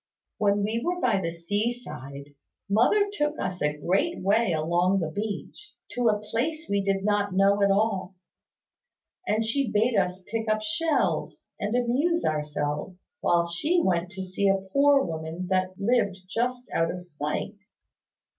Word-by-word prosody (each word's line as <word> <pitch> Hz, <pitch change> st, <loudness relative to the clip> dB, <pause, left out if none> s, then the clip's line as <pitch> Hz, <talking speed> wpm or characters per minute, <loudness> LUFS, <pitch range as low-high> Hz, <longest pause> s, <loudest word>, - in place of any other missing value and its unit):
When 205 Hz, -1 st, +2 dB
we 220 Hz, +3 st, -1 dB
were 355 Hz, +1 st, -1 dB
by 225 Hz, -, +2 dB
the 165 Hz, -, -1 dB
sea 205 Hz, +7 st, -1 dB
side, 140 Hz, -, -9 dB, 0.3 s
mother 245 Hz, -, +3 dB
took 295 Hz, -5 st, -1 dB
us 185 Hz, 0 st, -3 dB
a 150 Hz, 0 st, 0 dB
great 190 Hz, -, 0 dB
way 205 Hz, +2 st, +2 dB
along 175 Hz, +4 st, +2 dB
the 160 Hz, -3 st, -2 dB
beach, 215 Hz, -, -6 dB, 0.2 s
to 245 Hz, -1 st, 0 dB
a 210 Hz, -1 st, +1 dB
place 270 Hz, +10 st, -2 dB
we 200 Hz, 0 st, +1 dB
did 195 Hz, 0 st, 0 dB
not 205 Hz, -2 st, +1 dB
know 200 Hz, +1 st, +4 dB
at 200 Hz, -, +4 dB
all; 195 Hz, -2 st, +1 dB, 1.1 s
and 220 Hz, +1 st, +1 dB
she 255 Hz, +2 st, 0 dB
bade 220 Hz, +3 st, +2 dB
us 180 Hz, +1 st, 0 dB
pick 220 Hz, +2 st, -3 dB
up 215 Hz, 0 st, +1 dB
shells, 295 Hz, +9 st, 0 dB
and 210 Hz, +3 st, -1 dB
amuse 270 Hz, +8 st, +1 dB
ourselves, 150 Hz, +3 st, -3 dB
while 170 Hz, -1 st, +2 dB
she 300 Hz, -, +1 dB
went 175 Hz, -, +1 dB
to 190 Hz, 0 st, -5 dB
see 185 Hz, +2 st, 0 dB
a 195 Hz, -, +4 dB, 0.2 s
poor 280 Hz, -1 st, +5 dB
woman 160 Hz, +2 st, -4 dB
that 185 Hz, 0 st, 0 dB
lived 205 Hz, -2 st, +1 dB
just 245 Hz, +4 st, -2 dB
out 165 Hz, 0 st, +2 dB
of 180 Hz, -, -4 dB
sight. 175 Hz, +4 st, -4 dB
200 Hz, 160 wpm, -26 LUFS, 180-235 Hz, 1.1 s, poor